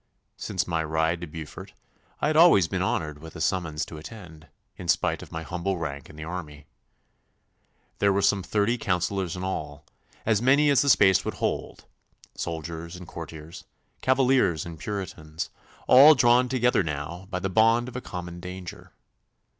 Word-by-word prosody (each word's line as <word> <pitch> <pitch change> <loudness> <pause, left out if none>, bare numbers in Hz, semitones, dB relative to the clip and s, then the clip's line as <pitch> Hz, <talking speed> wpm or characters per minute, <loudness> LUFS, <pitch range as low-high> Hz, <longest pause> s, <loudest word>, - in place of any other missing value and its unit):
Since 95 -4 -2
my 85 -2 0
ride 80 +2 0
to 85 - -5
Beaufort 80 -1 -9 0.5
I - - +1
had 155 +1 +1
always 160 - +6
been 90 +1 -2
honoured 75 -5 -2
with 80 +2 -11
a - - -7
summons 80 -3 -1
to 80 - -10
attend, 80 -4 -11 0.3
in - - -9
spite - - +1
of - - -12
my 80 0 -5
humble 90 +3 -3
rank 70 -4 -5
in - - -13
the 75 - -8
army. 75 -4 -7 1.3
There 100 0 +4
were 100 0 +1
some 100 - +3
thirty 105 +5 0
councillors 90 -1 -1
in 90 - -5
all, 75 -5 -5 0.4
as 110 -2 +2
many 140 +4 +4
as 135 -3 +4
the 140 - +1
space 95 -6 +5
would - - -4
hold, - - -3 0.5
soldiers 85 +1 -5
and 90 -1 -10
courtiers, 80 0 -9 0.4
Cavaliers 130 - +2
and 85 -2 -9
Puritans, 85 -6 -5 0.4
all 145 +4 +9
drawn 125 0 +4
together 125 -4 +2
now 80 +3 -5
by 95 - -3
the 95 +1 -2
bond 115 +5 +3
of 125 - -9
a 125 - -4
common 90 -4 -7
danger. 90 0 -9
90 Hz, 170 wpm, -26 LUFS, 80-105 Hz, 1.3 s, all